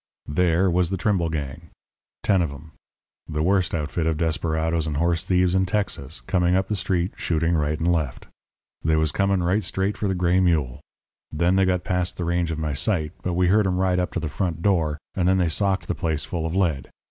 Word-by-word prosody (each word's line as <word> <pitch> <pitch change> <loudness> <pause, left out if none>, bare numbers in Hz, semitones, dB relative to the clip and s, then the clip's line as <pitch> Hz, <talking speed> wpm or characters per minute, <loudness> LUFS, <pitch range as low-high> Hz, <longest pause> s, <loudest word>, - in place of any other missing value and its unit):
"There 85 +4 +2
was 90 -1 +2
the 95 - -1
Trimble 90 -4 +1
gang 75 +1 -5 0.5
ten 95 -3 +3
of 85 - 0
'em 75 +3 -11 0.6
the 75 0 -1
worst 95 -1 +2
outfit 80 +1 -2
of 80 -1 0
desperadoes 80 0 0
and 75 -2 -2
horse 85 +1 +1
thieves 90 -1 +2
in 95 0 +2
Texas, 90 -7 -3
coming 90 -2 +1
up 95 0 0
the 105 - 0
street 90 0 -1
shooting 85 0 0
right 75 -1 0
and 80 - -1
left. 75 -7 -2 0.6
They 80 0 +2
was 80 -1 +2
coming 100 0 +1
right 95 +5 +1
straight 95 +2 -1
for 105 - -2
the 95 - 0
Gray 90 0 +2
Mule. 80 -9 +1 0.5
Then 85 +4 +2
they 95 0 +4
got 90 -1 0
past 90 -1 -1
the 85 - -2
range 85 0 0
of 80 - -3
my 75 -2 -2
sight, 75 +1 0
but 90 - -2
we 90 0 +2
heard 105 +1 +4
'em 90 -1 0
ride 90 -1 +2
up 90 - -1
to - - -1
the 80 - -3
front 85 +1 -3
door, 80 -7 +2 0.2
and 90 -2 0
then 95 0 +4
they 90 -3 +2
socked 95 +3 0
the - - 0
place 80 -5 -2
full 80 -2 -3
of 80 - -4
lead. 85 -9 0
85 Hz, 220 wpm, -24 LUFS, 80-95 Hz, 0.6 s, they